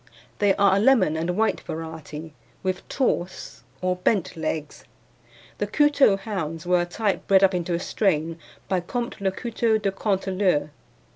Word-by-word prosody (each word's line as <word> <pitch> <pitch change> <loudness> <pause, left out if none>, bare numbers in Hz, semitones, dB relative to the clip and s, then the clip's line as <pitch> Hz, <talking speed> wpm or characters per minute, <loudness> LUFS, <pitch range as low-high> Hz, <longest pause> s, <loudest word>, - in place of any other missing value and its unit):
They 200 -2 +3
are 200 -1 +4
a - - +3
lemon 225 -9 +4
and 170 +3 -2
white 220 0 +1
variety, 160 -1 -7 0.3
with 185 -1 -3
torse 190 - -2 0.2
or 185 0 0
bent 185 0 0
legs. 155 -2 -4 0.8
The - - 0
Couteulx 285 -9 +4
hounds 165 -6 -4
were 180 0 +3
a - - -1
type 205 +2 -2
bred 195 0 +5
up 190 0 +5
into 175 -1 -1
a - - -1
strain 165 -4 0 0.3
by 185 - +1
Comte 235 +5 -4
le 195 - +2
Couteulx 220 +1 0
de 195 - +1
Canteleu. 190 -6 0
190 Hz, 155 wpm, -24 LUFS, 165-205 Hz, 0.8 s, bred